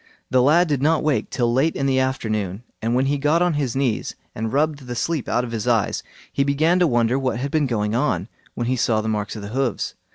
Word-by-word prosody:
The 130 -1 +4
lad 160 +7 +4
did 145 -4 0
not 155 +2 +2
wake 150 -3 0
till 120 -2 0
late 140 +6 +2
in 135 - -1
the 135 -1 +2
afternoon, 110 -6 -2 0.2
and 115 +2 0
when 130 +2 +2
he 140 +1 0
got 155 +4 +3
on 175 -1 +2
his 140 -5 -1
knees 130 -5 -1 0.2
and 110 0 -3
rubbed 145 -1 0
the 120 - -4
sleep 160 +2 -2
out 120 - +1
of 120 - -5
his 115 0 -3
eyes, 115 -5 +1 0.3
he 140 - +2
began 155 +6 +2
to 175 - +4
wonder 120 0 +2
what 130 -4 -1
had 135 +3 -3
been 155 -3 +2
going 105 -3 -1
on, 115 - 0 0.3
when 120 - -2
he 130 +2 +1
saw 110 -2 +2
the 110 - -4
marks 105 -1 -2
of 105 - -7
hoofs. 120 +3 -2
130 Hz, 245 wpm, -22 LUFS, 115-145 Hz, 0.3 s, The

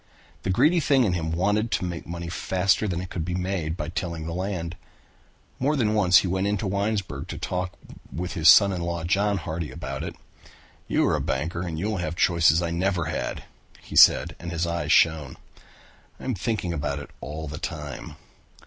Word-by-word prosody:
The - - -4
greedy 155 - +4
thing 140 -4 +3
in 100 -6 +1
him 80 -2 -2
wanted 105 +6 +1
to - - 0
make 85 -2 -5
money 85 +1 -5
faster 95 +4 +1
than 90 -3 -2
it 90 - -8
could 85 - -3
be 90 +2 -3
made 90 -3 -2
by 75 -1 -4
tilling 85 -3 -4
the 85 - -4
land. 90 -2 -3 0.8
More 145 +4 +1
than 110 -6 +1
once 95 -4 +5
he - - 0
went 95 +2 0
into 105 0 -1
Winesburg 100 +1 -2
to - - -6
talk 90 0 -3 0.4
with 90 +2 -4
his 80 -1 +5
son 100 -2 +8
in 90 -2 -3
law 85 -1 -3
John 100 +4 +1
Hardy 80 -2 -4
about 70 -4 -6
it. - - -6 0.7
"You - - +2
are - - +2
a - - -1
banker 85 +6 -2
and 85 -3 -4
you 85 - -2
will 105 -1 -1
have 85 -2 -3
chances 85 -2 +4
I 85 - -2
never 90 0 0
had," - - -3 0.4
he - - -10
said - - +6
and 85 - -6
his 85 0 -1
eyes 85 0 -2
shone. 80 -5 +3 0.8
"I - - -12
am 130 - -1
thinking 100 -4 -2
about 70 -2 -2
it 70 - -8
all 80 +2 -6
the 75 +1 -6
time. 75 -4 -6
85 Hz, 205 wpm, -25 LUFS, 80-95 Hz, 0.8 s, son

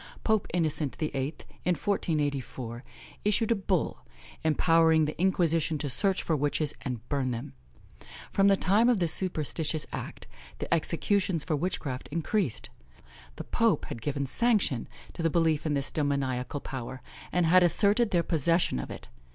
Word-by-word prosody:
Pope 220 -3 +1
Innocent 155 -4 0
VIII., 150 -1 -2 0.3
in 180 0 +2
1484, 140 - -2 0.4
issued 210 +2 +1
a - - +5
bull, 190 -4 -1 0.4
empowering 160 0 +4
the 150 - -3
Inquisition 165 -4 +2
to 145 -1 -1
search 195 +7 +1
for 160 - +1
witches 145 +1 0
and 125 -3 -5
burn 140 -3 0
them. 115 - -5 0.8
From 195 0 +3
the 195 -1 +5
time 210 +7 +3
of 245 - +4
this 170 -4 +2
superstitious 160 -3 -1
act, - - -6 0.3
the - - -2
executions 170 +1 +1
for 160 - -1
witchcraft 145 -5 -3
increased. 165 - -1 0.6
The - - -6
pope - - +1
had 115 - -6
given 140 +2 -2
sanction 205 - +1 0.3
to - - -6
the 165 - +2
belief 160 -2 +1
in 150 - +1
this 140 0 -2
demoniacal 140 -3 -1
power, 130 -1 -6 0.3
and 180 -1 +2
had 180 +3 +6
asserted 205 +6 +4
their 175 -3 +2
possession 165 - +1
of - - -5
it. - - -8
160 Hz, 150 wpm, -28 LUFS, 140-185 Hz, 0.8 s, had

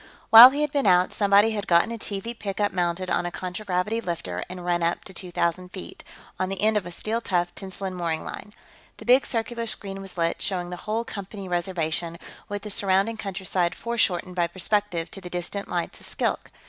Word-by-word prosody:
While 230 +3 +13
he 285 +3 -2
had 300 -2 0
been 280 -6 +1
out, 180 -1 +4
somebody 205 +2 +4
had 205 -2 -3
gotten 170 +6 +4
a 230 - -4
TV 205 +3 -3
pickup 205 -2 -2
mounted 180 0 -1
on 175 - +1
a - - -4
contragravity 185 +4 -2
lifter 125 - -4
and 180 -1 -7
run 175 -1 +1
up 170 +1 0
to 190 - -10
two 180 0 -6
thousand 175 +1 -1
feet, 185 - -9 0.4
on 185 - 0
the 195 -1 -4
end 215 +1 +3
of 200 -4 0
a - - -7
steel 220 +6 -3
tough 175 -4 0
tensilon 190 0 -6
mooring 170 -3 -2
line. 210 - -8 0.5
The - - -11
big 255 +3 +5
circular 230 0 -2
screen 195 -3 -2
was 195 -2 -10
lit, 165 0 0
showing 180 -2 -2
the 180 - -5
whole 225 +2 0
Company 200 -2 -7
Reservation, 170 -2 -1 0.3
with 205 0 -4
the 210 - -3
surrounding 195 +3 +2
countryside 185 -3 -1
foreshortened 185 -6 -1
by 175 -1 +2
perspective 185 -1 -1
to 195 - -7
the 180 - -8
distant 180 +3 -4
lights 175 -1 -3
of - - -9
Skilk. - - -2
190 Hz, 205 wpm, -25 LUFS, 175-210 Hz, 0.5 s, While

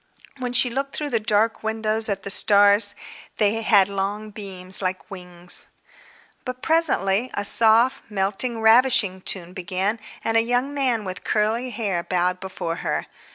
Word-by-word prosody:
When 250 -1 -4
she 245 0 +4
looked 275 +3 -4
through 295 -1 -3
the 230 - +1
dark 215 +1 0
windows 220 0 0
at 195 -1 -3
the 200 - -1
stars, 205 +1 +4 0.4
they 215 +1 +1
had 200 -3 +4
long 200 +2 -4
beams 190 -3 0
like 185 +1 -4
wings.... 180 -1 -1 0.8
But 255 -1 -8
presently 255 -9 +1
a 205 - -2
soft, 230 +5 +3
melting, 210 +4 -2
ravishing 220 -4 +4
tune 180 -2 0
began, 190 +4 -3 0.2
and 225 0 0
a - - +5
young 245 +4 -2
man 255 -6 -1
with 185 -1 -7
curly 220 +4 -1
hair 205 -6 -3
bowed 180 +1 -1
before 175 -3 -6
her. - - -3
210 Hz, 155 wpm, -22 LUFS, 190-235 Hz, 0.8 s, a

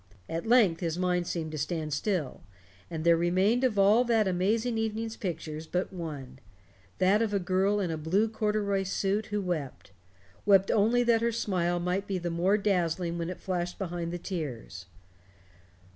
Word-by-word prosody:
At 165 +5 -4
length 220 -9 +4
his 165 -2 -2
mind 180 -1 0
seemed 160 -2 -3
to 155 - -5
stand 155 0 -2
still, 170 -3 -2 0.5
and 160 -2 -4
there 170 0 +5
remained 185 +8 +2
of 245 -5 +1
all 205 +5 +5
that 225 -3 +2
amazing 220 +6 0
evening's 225 0 -2
pictures 160 -5 -5
but 180 +3 -2
one 145 -7 -7 0.6
that 195 +4 +3
of 215 -3 0
a - - +2
girl 190 +3 +1
in 185 -4 -1
a 160 - -2
blue 185 +8 +1
corduroy 210 -2 0
suit 195 +2 -1
who 210 0 -2
wept 155 - -4 0.5
wept 195 -1 +4
only 230 +4 +3
that 235 -1 +3
her 235 0 +1
smile 175 -6 0
might 180 +3 -1
be 195 - -1
the 175 -1 -3
more 180 +5 +2
dazzling 175 -4 0
when 170 0 -3
it 180 - -6
flashed 180 -2 -3
behind 175 -3 -4
the 175 - -3
tears. 135 - -6
185 Hz, 175 wpm, -29 LUFS, 170-210 Hz, 0.6 s, there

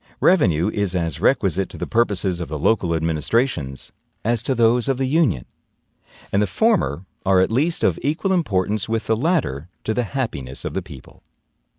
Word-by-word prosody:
Revenue 95 - +3
is 100 -3 -1
as 85 -3 -2
requisite 95 -5 +2
to - - -10
the - - -3
purposes 100 -6 0
of 85 - -4
the 75 - -4
local 85 0 +1
administrations 80 - -1 0.3
as 115 -1 +1
to 135 - -1
those 120 +1 +3
of 135 -2 +1
the 135 - 0
Union; 130 - +1 0.9
and 100 - +2
the 105 - +2
former 100 - +1 0.2
are 95 -1 +4
at 95 - +2
least 155 +8 +1
of - - +2
equal 160 +7 0
importance 105 - 0
with 115 0 -1
the 110 - +2
latter 115 - -1
to 110 - -1
the 125 +1 0
happiness 85 - -4
of - - -3
the - - -1
people. - - -13
105 Hz, 180 wpm, -21 LUFS, 85-130 Hz, 0.9 s, are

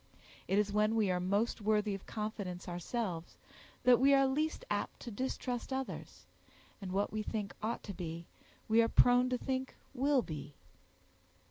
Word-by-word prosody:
It 195 - +2
is 205 -1 +2
when 215 +1 +3
we 210 -4 +3
are 180 - +1
most 200 +6 0
worthy 210 0 +2
of 195 - -7
confidence 205 -5 -4
ourselves, 175 0 -3 0.5
that 250 -1 +6
we 275 +2 +6
are 275 0 +5
least 310 - 0
apt - - -2
to 240 - -6
distrust 250 +2 -3
others; 265 0 -5 0.6
and 190 -2 -5
what 200 +3 0
we 215 - -1
think 210 -2 -3
ought 225 +2 -2
to 200 - -6
be, 170 -1 -5 0.4
we 225 +1 +5
are 230 - +2
prone 245 +1 +5
to 250 - +1
think 260 0 -3 0.2
will 275 0 +3
be. 150 -4 -7
215 Hz, 165 wpm, -34 LUFS, 195-250 Hz, 0.6 s, that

